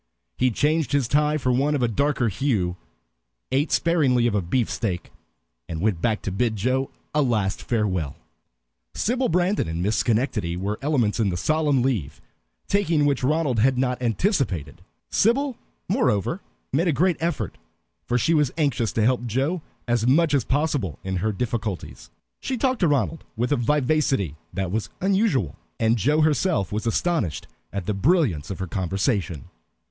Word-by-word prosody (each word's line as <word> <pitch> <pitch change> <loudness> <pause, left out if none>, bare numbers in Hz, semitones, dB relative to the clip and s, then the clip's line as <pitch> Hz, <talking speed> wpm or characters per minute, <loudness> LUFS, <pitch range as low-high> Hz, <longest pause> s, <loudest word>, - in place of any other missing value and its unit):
He 130 - +2
changed 150 +3 +1
his 140 -4 +2
tie 150 +3 +2
for 130 -3 0
one 140 +4 +2
of 135 - 0
a - - +3
darker 140 +2 +1
hue, 100 -5 0 0.8
ate 140 +4 +1
sparingly 140 -8 +3
of 120 - +2
a 105 - +1
beefsteak, 95 -1 -2 0.6
and 80 - -4
went 95 -3 0
back 110 0 0
to 95 - -2
bid 115 +3 0
Joe 130 +6 0 0.2
a 150 - +3
last 110 -8 0
farewell. 95 - -1 0.8
Sybil 250 +3 0
Brandon 180 - +1
and 80 +2 -2
Miss 105 +2 +1
Schenectady 110 -8 0
were 100 +4 -3
elements 130 -7 +1
in 105 -3 +2
the 85 - -2
solemn 150 - +2
leave 100 - -1 0.5
taking 170 -7 +2
which 140 -3 +1
Ronald 145 -4 +1
had 130 +3 +3
not 125 -1 0
anticipated. 115 - 0 0.3
Sybil, 260 +4 +2 0.3
moreover, 185 - +1 0.3
made 165 +6 +2
a - - +4
great 180 +4 +2
effort, 170 +1 -2 0.5
for 125 - +2
she 160 +7 +2
was 150 -4 +3
anxious 130 -8 +1
to 110 - +1
help 125 0 +1
Joe 135 - 0 0.3
as 120 -1 +1
much 150 +3 +4
as 140 -4 +3
possible 140 - -1
in 95 -1 -2
her 110 +5 0
difficulties. 110 -3 -4 0.3
She 260 - -3
talked 260 0 +1
to 175 - +3
Ronald 145 +2 0
with 120 +4 0
a - - +5
vivacity 135 - +1 0.2
that 95 0 -3
was 110 +2 -2
unusual, 190 - +1 0.2
and 115 0 +3
Joe 145 +8 +2
herself 155 - +1
was 105 +2 -2
astonished 115 - 0 0.3
at 100 -3 -4
the 105 - 0
brilliance 100 - +1
of 95 - -4
her 95 - -3
conversation. 95 - -1
125 Hz, 165 wpm, -24 LUFS, 105-150 Hz, 0.8 s, a